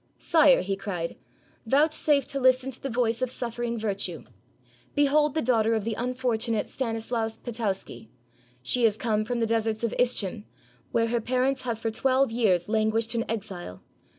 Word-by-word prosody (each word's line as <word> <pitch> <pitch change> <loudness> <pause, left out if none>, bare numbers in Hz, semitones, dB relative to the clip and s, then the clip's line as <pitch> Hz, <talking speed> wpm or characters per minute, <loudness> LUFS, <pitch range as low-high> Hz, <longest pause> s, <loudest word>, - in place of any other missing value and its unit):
"Sire," 300 -5 +5
he 195 +1 -1
cried, 185 -4 -4 0.5
"vouchsafe 290 +1 +3
to 275 -1 -2
listen 260 0 +3
to 255 - -9
the 275 - -3
voice 235 -1 0
of 255 - 0
suffering 240 -1 -3
virtue; 205 -3 -3 0.7
behold 295 +1 +3
the 315 - +1
daughter 225 -2 +2
of 220 - -1
the 225 +1 -2
unfortunate 240 -2 -1
Stan 235 -4 -2
islaus 225 0 -3
Potowsky; 220 -2 -4 0.5
she 240 - 0
has 215 -2 +2
come 215 -3 0
from 240 +2 -2
the - - +3
deserts 225 0 0
of 230 - 0
Ischim, 205 - 0 0.5
where 230 0 +1
her 235 0 0
parents 255 +3 0
have 235 -3 -1
for 225 0 -2
twelve 260 +2 +2
years 200 -7 +2
lan 215 0 +2
guished 225 +1 -1
in 230 0 -2
exile. 195 - -5
230 Hz, 170 wpm, -27 LUFS, 220-255 Hz, 0.7 s, Sire